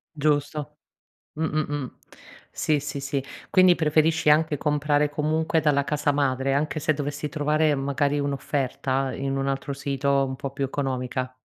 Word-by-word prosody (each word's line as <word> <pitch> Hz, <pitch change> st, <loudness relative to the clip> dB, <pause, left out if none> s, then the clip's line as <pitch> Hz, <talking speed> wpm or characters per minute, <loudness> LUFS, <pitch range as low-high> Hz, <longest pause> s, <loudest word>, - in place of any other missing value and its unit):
Giusto. 150 Hz, 0 st, -1 dB, 0.6 s
Mh-mh, 155 Hz, -1 st, 0 dB
mh. 135 Hz, -4 st, -5 dB, 0.5 s
Sì, 150 Hz, -2 st, +1 dB
sì, 145 Hz, -1 st, -4 dB
sì. 140 Hz, -1 st, -2 dB, 0.3 s
Quindi, 185 Hz, -1 st, +6 dB
preferisci 160 Hz, 0 st, +2 dB
anche 150 Hz, -1 st, +3 dB
comprare 150 Hz, 0 st, +1 dB
comunque 155 Hz, +2 st, 0 dB
dalla 140 Hz, -2 st, +2 dB
casa 145 Hz, -1 st, +1 dB
madre, 135 Hz, -1 st, +1 dB
anche 150 Hz, +2 st, 0 dB
se 155 Hz, +1 st, +2 dB
dovessi 145 Hz, +1 st, -4 dB
trovare 155 Hz, 0 st, +1 dB
magari 140 Hz, +1 st, 0 dB
un'offerta 135 Hz, -1 st, -1 dB
in 135 Hz, 0 st, -2 dB
un 135 Hz, 0 st, -1 dB
altro 135 Hz, +1 st, -2 dB
sito 140 Hz, 0 st, 0 dB
un 130 Hz, 0 st, -4 dB
po' 135 Hz, +1 st, -5 dB
più 135 Hz, 0 st, -2 dB
economica. 130 Hz, -2 st, -3 dB
145 Hz, 145 wpm, -25 LUFS, 135-150 Hz, 0.6 s, Quindi